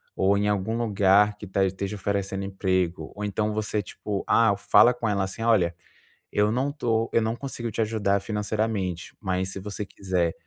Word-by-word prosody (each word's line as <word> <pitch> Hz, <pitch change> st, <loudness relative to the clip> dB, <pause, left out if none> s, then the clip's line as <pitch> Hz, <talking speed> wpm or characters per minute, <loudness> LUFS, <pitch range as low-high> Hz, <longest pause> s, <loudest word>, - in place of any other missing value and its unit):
ou 100 Hz, +1 st, +3 dB
em 105 Hz, -, +1 dB
algum 105 Hz, +3 st, 0 dB
lugar 105 Hz, -2 st, +3 dB
que 105 Hz, -, -8 dB
tá 95 Hz, +1 st, +1 dB
esteja 95 Hz, +2 st, -3 dB
oferecendo 100 Hz, 0 st, -2 dB
emprego, 95 Hz, -4 st, -1 dB
ou 105 Hz, -, -5 dB
então 105 Hz, +1 st, -1 dB
você 105 Hz, 0 st, -1 dB
tipo, 100 Hz, -1 st, -4 dB
ah, 115 Hz, -3 st, +4 dB
fala 120 Hz, +4 st, +5 dB
com 115 Hz, -1 st, -3 dB
ela 100 Hz, -1 st, +1 dB
assim: 105 Hz, +4 st, -6 dB
"Olha, 95 Hz, -7 st, +3 dB, 0.6 s
eu 105 Hz, +1 st, +2 dB
não 130 Hz, +4 st, 0 dB
estou, 115 Hz, -6 st, 0 dB
eu 115 Hz, -, +4 dB
não 110 Hz, +1 st, -1 dB
consigo 120 Hz, -3 st, -5 dB
te 115 Hz, -, -1 dB
ajudar 100 Hz, -3 st, +1 dB
financeiramente, 105 Hz, -3 st, -2 dB
mas, 95 Hz, -1 st, -1 dB
se 95 Hz, -, -5 dB
você 105 Hz, +1 st, -5 dB
quiser, 90 Hz, -4 st, -1 dB
100 Hz, 185 wpm, -26 LUFS, 95-110 Hz, 0.6 s, fala